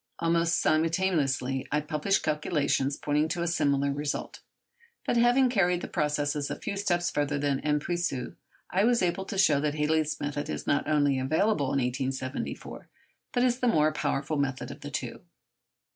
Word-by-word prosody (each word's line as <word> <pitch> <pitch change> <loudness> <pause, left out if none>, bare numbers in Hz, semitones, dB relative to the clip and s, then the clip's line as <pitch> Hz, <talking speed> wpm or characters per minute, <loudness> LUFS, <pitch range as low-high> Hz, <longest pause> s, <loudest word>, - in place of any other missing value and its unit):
Almost 170 0 +2
simultaneously 155 -6 +1
I 150 - +2
published 150 +6 0
calculations 145 -2 0
pointing 150 +1 +1
to 170 +1 -2
a - - -1
similar 140 -4 +1
result; 145 +1 -4 0.7
but - - 0
having 245 +2 +4
carried 180 -7 +2
the - - -5
processes 150 -2 -1
a - - -2
few - - -5
steps 175 -3 0
further 145 0 0
than 140 -1 0
M. 150 0 +1
Puiseux, 165 -7 -2 0.4
I 190 +2 +2
was 235 -2 +3
able 180 +2 0
to 195 - -5
show 155 -7 +4
that 150 0 -1
Halley's 155 0 0
method 145 0 -3
is 75 - -4
not 145 - +1
only 145 -3 +2
available 155 +5 +1
in 140 - 0
1874, 130 +1 -3 0.4
but 245 - +1
is 250 0 +2
the 250 - +1
more 155 -8 +3
powerful 145 0 -1
method 135 -2 -2
of - - -11
the - - -6
two. - - -5
150 Hz, 170 wpm, -28 LUFS, 140-175 Hz, 0.7 s, having